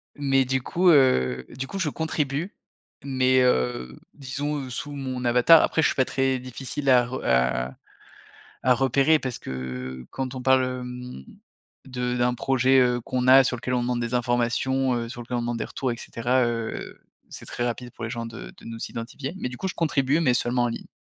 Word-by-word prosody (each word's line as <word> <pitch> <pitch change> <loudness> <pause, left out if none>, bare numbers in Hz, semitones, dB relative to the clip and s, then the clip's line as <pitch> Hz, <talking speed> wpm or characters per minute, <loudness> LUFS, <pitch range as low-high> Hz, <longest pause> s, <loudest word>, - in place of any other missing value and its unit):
mais 135 -2 +2
du 130 0 -1
coup, 180 +6 +2
heu, 65 - +4
du 130 +2 -6
coup 195 - -6
je 175 -6 0
contribue. 155 +2 -2 0.5
Mais, 130 -1 +2
heu, 65 - 0 0.2
disons, 145 +2 -3
heu, - - -9
sous 145 +5 -5
mon 130 -2 -4
avatar. 125 +7 +6
Après 160 - +1
je - - +5
suis - - -2
pas 130 - +3
très 135 -1 0
difficile 130 +2 -4
à 125 -2 +6
re 130 +2 -5
à 60 0 +1 0.9
à 130 0 +5
repérer 135 +4 +3
parce 130 -4 -5
que 65 -1 -6
quand 130 -1 -4
on 130 - -5
parle, 130 0 +4
hem, 125 - -6 0.6
de 125 -1 -3
d'un 125 0 +2
projet, 130 +1 +3
heu, 125 -1 +2
qu'on 125 +1 -2
a 135 0 +8
sur 125 - 0
lequel 125 +1 -4
on 125 - +1
demande 120 0 -1
des 120 +1 -3
informations, 125 +2 +1
heu, 120 -1 -3
sur 120 +1 -8
lequel 120 +1 -4
on - - -1
demande 120 0 -2
des - - -2
retours 130 -3 -3
et - - -9
cetera, 120 +3 0
heu, 115 -1 -4 0.3
c'est - - -9
très 120 - -4
rapide 120 +1 -4
pour 115 - -10
les 110 - -3
gens 115 -1 -4
de 115 0 -8
de - - -16
nous 115 0 -7
identifier. 130 +5 -6
Mais - - -3
du 125 - -7
coup 190 - -3
je - - -5
contribue, 150 -2 +1
mais 135 -7 +3
seulement 120 0 +1
en 120 - +2
ligne. 115 - -6
125 Hz, 210 wpm, -25 LUFS, 120-135 Hz, 0.9 s, a